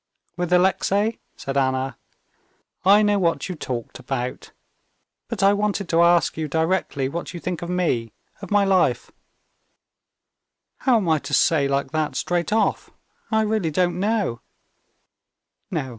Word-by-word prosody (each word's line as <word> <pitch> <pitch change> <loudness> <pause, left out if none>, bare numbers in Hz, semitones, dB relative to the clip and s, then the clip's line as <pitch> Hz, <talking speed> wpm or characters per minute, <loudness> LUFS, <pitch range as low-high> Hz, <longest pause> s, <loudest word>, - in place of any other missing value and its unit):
"With 175 -1 -3
Alexey," 195 +4 +2 0.2
said 135 0 -4
Anna, 130 0 0 0.9
"I 200 +3 +6
know 205 -1 +2
what 170 -3 0
you - - -2
talked 125 -7 -6
about. 125 -2 -4 0.8
But 215 -5 -3
I 200 +1 +6
wanted 205 -2 -1
to 165 0 +3
ask 170 -1 +3
you 160 -1 -2
directly 160 -3 0
what 170 +5 -5
you - - -5
think 175 -1 -4
of 175 - -5
me, 160 -11 0 0.3
of 195 - -8
my 205 -1 +3
life?" 190 -1 +1 1.7
"How 255 -3 +3
am 200 -5 -1
I 160 -1 +3
to 140 0 -2
say 145 -4 +3
like 140 0 -1
that 155 -4 -1
straight 175 +7 -1
off? 220 -1 +1 0.4
I 220 -1 +2
really 215 -5 0
don't 175 +2 0
know." 200 - 0
175 Hz, 145 wpm, -23 LUFS, 145-200 Hz, 1.7 s, I